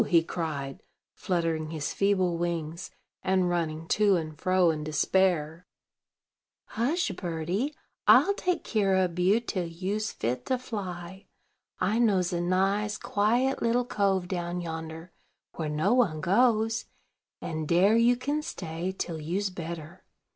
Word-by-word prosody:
he 170 Hz, -3 st, +4 dB
cried, 150 Hz, -6 st, -4 dB, 0.3 s
fluttering 165 Hz, -3 st, -1 dB
his 155 Hz, -2 st, -3 dB
feeble 185 Hz, -3 st, +2 dB
wings, 170 Hz, 0 st, -3 dB, 0.3 s
and 185 Hz, -1 st, +1 dB
running 165 Hz, -2 st, -2 dB
to 205 Hz, 0 st, +3 dB
and 155 Hz, -3 st, -3 dB
fro 185 Hz, -2 st, +3 dB
in 155 Hz, -1 st, -4 dB
despair. 165 Hz, +1 st, +1 dB, 1.0 s
"Hush, 270 Hz, -, 0 dB
birdie, 180 Hz, -, -2 dB, 0.3 s
I'll 400 Hz, -, +7 dB
take 360 Hz, -3 st, -1 dB
kere 200 Hz, -4 st, +1 dB
ob 180 Hz, -1 st, -3 dB
you 190 Hz, +5 st, +4 dB
till 190 Hz, -7 st, -3 dB
you's 190 Hz, +6 st, -3 dB
fit 125 Hz, +2 st, -3 dB
to 255 Hz, -, +1 dB
fly. 190 Hz, -6 st, -6 dB, 0.5 s
I 200 Hz, +5 st, +1 dB
knows 190 Hz, -6 st, +2 dB
a 170 Hz, -, 0 dB
nice, 195 Hz, +4 st, +1 dB
quiet 240 Hz, +3 st, +1 dB
little 240 Hz, +1 st, +2 dB
cove 195 Hz, -5 st, 0 dB
down 175 Hz, -1 st, -3 dB
yonder, 160 Hz, 0 st, -6 dB, 0.5 s
where 155 Hz, -2 st, -2 dB
no 155 Hz, +9 st, +1 dB
one 215 Hz, -12 st, +2 dB
goes; 220 Hz, +5 st, +2 dB, 0.5 s
and 155 Hz, -1 st, -4 dB
dare 185 Hz, +7 st, +4 dB
you 235 Hz, +2 st, +5 dB
kin 285 Hz, +5 st, -2 dB
stay 175 Hz, -, -4 dB
till 165 Hz, -3 st, -4 dB
you's 190 Hz, +6 st, -1 dB
better. 170 Hz, 0 st, -7 dB
180 Hz, 135 wpm, -28 LUFS, 165-210 Hz, 1.0 s, I'll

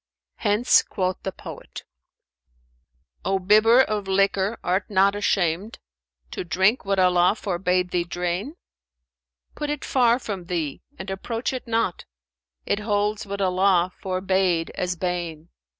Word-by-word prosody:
'[FN#406] -, -, -34 dB
Hence 215 Hz, +5 st, +4 dB
quoth 185 Hz, -1 st, -3 dB
the 190 Hz, -, -3 dB
poet, -, -, -10 dB, 1.4 s
'O 195 Hz, 0 st, +1 dB
bibber 215 Hz, +6 st, +5 dB
of 210 Hz, -5 st, -1 dB
liquor, 195 Hz, +2 st, +1 dB
art 185 Hz, +3 st, 0 dB
not 200 Hz, 0 st, +3 dB
ashamed 195 Hz, 0 st, 0 dB, 0.3 s
* -, -, -44 dB
To -, -, -4 dB
drink 190 Hz, +7 st, +2 dB
what 195 Hz, 0 st, 0 dB
Allah 180 Hz, +1 st, +4 dB
forbade 180 Hz, -2 st, -1 dB
thee 175 Hz, -1 st, +1 dB
drain? 180 Hz, -, -3 dB, 1.0 s
Put 295 Hz, -1 st, -4 dB
it 295 Hz, -2 st, -3 dB
far 240 Hz, -2 st, +3 dB
from 200 Hz, -8 st, -6 dB
thee 165 Hz, -5 st, -3 dB, 0.2 s
and 190 Hz, 0 st, -6 dB
approach 230 Hz, +6 st, -3 dB
it 255 Hz, -1 st, -6 dB
not; 225 Hz, -5 st, -1 dB, 0.3 s
* 65 Hz, 0 st, -56 dB
It 205 Hz, -, 0 dB
holds 210 Hz, 0 st, -1 dB
what 200 Hz, 0 st, -4 dB
Allah 185 Hz, -1 st, +2 dB
forbade 185 Hz, -2 st, 0 dB
as 180 Hz, 0 st, -2 dB
bane.' 175 Hz, -2 st, -4 dB
190 Hz, 140 wpm, -24 LUFS, 180-210 Hz, 1.4 s, bibber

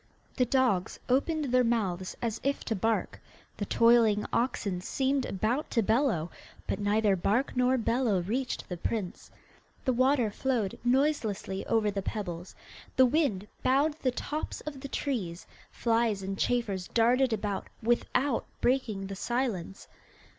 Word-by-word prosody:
The 250 Hz, -, +3 dB
dogs 245 Hz, -8 st, +1 dB
opened 300 Hz, +4 st, +1 dB
their 255 Hz, 0 st, +5 dB
mouths 195 Hz, -6 st, -1 dB
as 225 Hz, -2 st, -2 dB
if 275 Hz, +1 st, -1 dB
to 225 Hz, -, -1 dB
bark, 225 Hz, +3 st, -1 dB, 0.4 s
the 205 Hz, -, -3 dB
toiling 230 Hz, -3 st, +4 dB
oxen 205 Hz, -6 st, 0 dB
seemed 265 Hz, +6 st, 0 dB
about 225 Hz, +10 st, -1 dB
to 230 Hz, -, +1 dB
bellow, 220 Hz, -, +1 dB, 0.3 s
but -, -, -2 dB
neither 205 Hz, 0 st, +2 dB
bark 215 Hz, +10 st, 0 dB
nor 250 Hz, +1 st, +3 dB
bellow 230 Hz, -4 st, +1 dB
reached 250 Hz, +7 st, -2 dB
the 180 Hz, -, -5 dB
prince. 190 Hz, +1 st, -4 dB, 0.6 s
The 260 Hz, -, +2 dB
water 255 Hz, -2 st, +3 dB
flowed 230 Hz, -4 st, -1 dB
noiselessly 245 Hz, -7 st, 0 dB
over 220 Hz, -2 st, +2 dB
the 200 Hz, 0 st, -2 dB
pebbles, 180 Hz, -4 st, -5 dB, 0.4 s
the 260 Hz, -, +7 dB
wind 245 Hz, -, +1 dB
bowed 280 Hz, +4 st, +3 dB
the 260 Hz, -, +1 dB
tops 295 Hz, +5 st, -4 dB
of 285 Hz, -3 st, -7 dB
the 275 Hz, -, -5 dB
trees, 205 Hz, -, -3 dB, 0.2 s
flies 225 Hz, -4 st, +1 dB
and 195 Hz, +1 st, -3 dB
chafers 200 Hz, -5 st, -1 dB
darted 245 Hz, +3 st, +3 dB
about, 205 Hz, -2 st, -2 dB, 0.2 s
without 240 Hz, +2 st, +1 dB
breaking 240 Hz, -6 st, 0 dB
the 195 Hz, 0 st, -6 dB
silence. 225 Hz, -5 st, -2 dB
230 Hz, 140 wpm, -29 LUFS, 200-260 Hz, 0.6 s, the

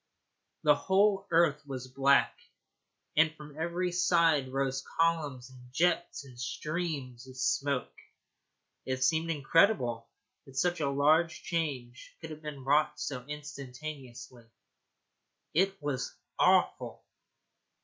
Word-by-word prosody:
The 150 Hz, -, +6 dB
whole 195 Hz, +5 st, +2 dB
earth 160 Hz, -3 st, +3 dB
was 130 Hz, -2 st, -6 dB
black, 135 Hz, +2 st, +3 dB, 0.8 s
and 155 Hz, +1 st, +5 dB
from 150 Hz, -1 st, -12 dB
every 170 Hz, +3 st, -1 dB
side 170 Hz, -6 st, +3 dB
rose 135 Hz, 0 st, -1 dB
columns 150 Hz, -7 st, 0 dB
and 125 Hz, -1 st, -15 dB
jets 175 Hz, +1 st, 0 dB
and 125 Hz, -3 st, -14 dB
streams 135 Hz, -1 st, -4 dB
of 130 Hz, 0 st, -12 dB
smoke. 130 Hz, 0 st, 0 dB, 0.9 s
It 130 Hz, 0 st, -2 dB
seemed 160 Hz, +4 st, +2 dB
incredible 140 Hz, -, +2 dB, 0.4 s
that 135 Hz, -, -14 dB
such 175 Hz, +3 st, +1 dB
a 150 Hz, +4 st, +3 dB
change 140 Hz, -9 st, -4 dB
could 160 Hz, -, -8 dB
have 155 Hz, 0 st, -9 dB
been 150 Hz, -3 st, -7 dB
wrought 145 Hz, +3 st, +2 dB
so 125 Hz, -3 st, -4 dB
instantaneously. 135 Hz, -4 st, -8 dB, 1.1 s
It 195 Hz, +3 st, +2 dB
was 135 Hz, -3 st, -3 dB, 0.2 s
awful. -, -, +2 dB
145 Hz, 110 wpm, -30 LUFS, 130-165 Hz, 1.1 s, The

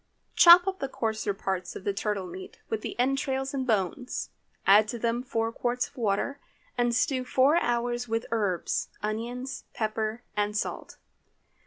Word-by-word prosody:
Chop 350 Hz, +1 st, +9 dB
up 385 Hz, -1 st, -2 dB
the 275 Hz, -, -2 dB
coarser 220 Hz, -4 st, -1 dB
parts 190 Hz, -2 st, -3 dB
of -, -, -7 dB
the 200 Hz, -, 0 dB
turtle 200 Hz, -1 st, -2 dB
meat, 180 Hz, +1 st, -9 dB
with 220 Hz, -1 st, -1 dB
the -, -, -6 dB
entrails 270 Hz, +1 st, 0 dB
and 265 Hz, -2 st, -2 dB
bones. 220 Hz, +4 st, -1 dB, 0.3 s
Add 205 Hz, +2 st, +6 dB
to 240 Hz, -, -4 dB
them 235 Hz, +1 st, 0 dB
four 225 Hz, -3 st, -1 dB
quarts 245 Hz, +1 st, -1 dB
of -, -, -25 dB
water, 235 Hz, +5 st, -1 dB, 0.4 s
and 240 Hz, -1 st, +1 dB
stew 255 Hz, +1 st, +1 dB
four 265 Hz, +5 st, +3 dB
hours 240 Hz, -3 st, 0 dB
with 225 Hz, +1 st, -1 dB
the -, -, -14 dB
herbs, 205 Hz, -6 st, 0 dB, 0.2 s
onions, 240 Hz, +5 st, -4 dB
pepper, 220 Hz, +1 st, -2 dB
and 210 Hz, 0 st, 0 dB
salt. -, -, -4 dB
230 Hz, 165 wpm, -28 LUFS, 210-255 Hz, 0.4 s, Chop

